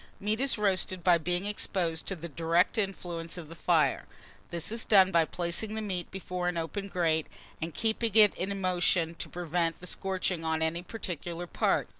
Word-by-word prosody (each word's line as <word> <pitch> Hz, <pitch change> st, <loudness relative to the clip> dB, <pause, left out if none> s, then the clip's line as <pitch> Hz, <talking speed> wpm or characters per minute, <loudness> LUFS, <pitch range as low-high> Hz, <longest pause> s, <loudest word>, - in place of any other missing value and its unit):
Meat 210 Hz, +2 st, -1 dB
is 275 Hz, -2 st, +2 dB
roasted 185 Hz, -3 st, 0 dB
by 175 Hz, -1 st, +5 dB
being 175 Hz, +3 st, -1 dB
exposed 180 Hz, -5 st, -2 dB
to 195 Hz, -, -2 dB
the 170 Hz, -1 st, -7 dB
direct 170 Hz, -, +2 dB
influence 175 Hz, -4 st, -3 dB
of 165 Hz, -3 st, -8 dB
the 165 Hz, -, -9 dB
fire. -, -, +2 dB, 0.4 s
This 170 Hz, +3 st, -2 dB
is 230 Hz, 0 st, 0 dB
done 190 Hz, -3 st, +6 dB
by 165 Hz, -2 st, +4 dB
placing 175 Hz, +7 st, -1 dB
the 220 Hz, -, -2 dB
meat 185 Hz, -4 st, -3 dB
before 180 Hz, -1 st, -4 dB
an 180 Hz, -1 st, -1 dB
open 195 Hz, +5 st, -3 dB
grate, 165 Hz, -4 st, +1 dB, 0.3 s
and 165 Hz, +2 st, -2 dB
keeping 225 Hz, +2 st, 0 dB
it 210 Hz, -3 st, +8 dB
in 195 Hz, +2 st, -3 dB
motion 175 Hz, -2 st, +1 dB
to 165 Hz, -, -7 dB
prevent 170 Hz, -1 st, -1 dB
the 180 Hz, -, -10 dB
scorching 185 Hz, -2 st, -1 dB
on 160 Hz, 0 st, 0 dB
any 165 Hz, +2 st, 0 dB
particular 175 Hz, -3 st, -5 dB
part. -, -, +1 dB
180 Hz, 185 wpm, -30 LUFS, 165-195 Hz, 0.4 s, it